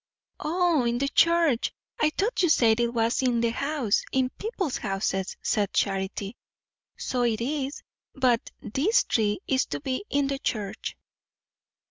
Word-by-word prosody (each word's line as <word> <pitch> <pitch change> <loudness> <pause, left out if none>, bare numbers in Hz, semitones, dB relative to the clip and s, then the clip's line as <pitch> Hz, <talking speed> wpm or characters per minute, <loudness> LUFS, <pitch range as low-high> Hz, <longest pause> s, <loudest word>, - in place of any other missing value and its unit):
"O, 335 -2 +2
in 235 0 +1
the 275 +2 0
church! 335 -6 +3 0.3
I 305 - +4
thought 420 +3 +1
you 350 - +3
said 230 -6 +4
it 235 0 +1
was 230 +1 +1
in 245 -2 +2
the 230 0 +1
house 275 -4 0
in 260 -1 +1
people's 395 - -3
houses," 195 -2 -2
said 205 -3 0
Charity. 195 +2 -1 0.6
"So 250 - -2
it 230 -2 +1
is; 275 +3 -3 0.3
but 255 -4 +2
this 315 - +2
tree 215 - 0
is 265 0 +2
to - - -4
be 265 +3 -3
in 285 0 +2
the 275 0 -2
church." 210 -7 -3
255 Hz, 150 wpm, -26 LUFS, 225-295 Hz, 0.6 s, I